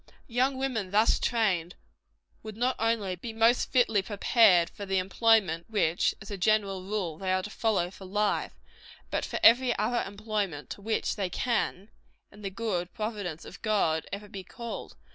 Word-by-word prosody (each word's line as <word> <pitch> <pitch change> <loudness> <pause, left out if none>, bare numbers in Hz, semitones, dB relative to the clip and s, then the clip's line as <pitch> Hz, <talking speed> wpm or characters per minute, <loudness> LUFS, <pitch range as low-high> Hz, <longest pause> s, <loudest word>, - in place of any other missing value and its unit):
Young 260 +3 0
women 250 -8 -2
thus 215 +4 +3
trained, 190 -8 0 0.7
would 215 -1 -9
not 250 +2 +1
only 220 -5 0
be 225 +6 -7
most 225 +2 +3
fitly 235 -5 +3
prepared 200 -3 +4
for 205 - -9
the 195 -1 -1
employment 190 -3 +2
which, 175 -6 +1
as 200 - -10
a 200 - -5
general 195 -1 +1
rule, 190 -6 -3
they 190 -1 -1
are 185 0 +1
to 210 - -7
follow 200 -7 0
for 190 - -12
life, 205 +2 0 0.6
but - - -1
for - - -4
every 240 +1 +6
other 240 +2 0
employment 200 -6 -4
to - - -7
which 220 +2 -1
they 195 -3 -1
can, 215 -1 -2 0.4
in 210 - -15
the 200 - -3
good 190 -4 -3
providence 205 -7 -4
of 180 - -11
God, 180 -8 +1
ever 205 +1 -6
be 195 -2 -8
called. 235 +5 -7
205 Hz, 170 wpm, -28 LUFS, 185-225 Hz, 0.7 s, every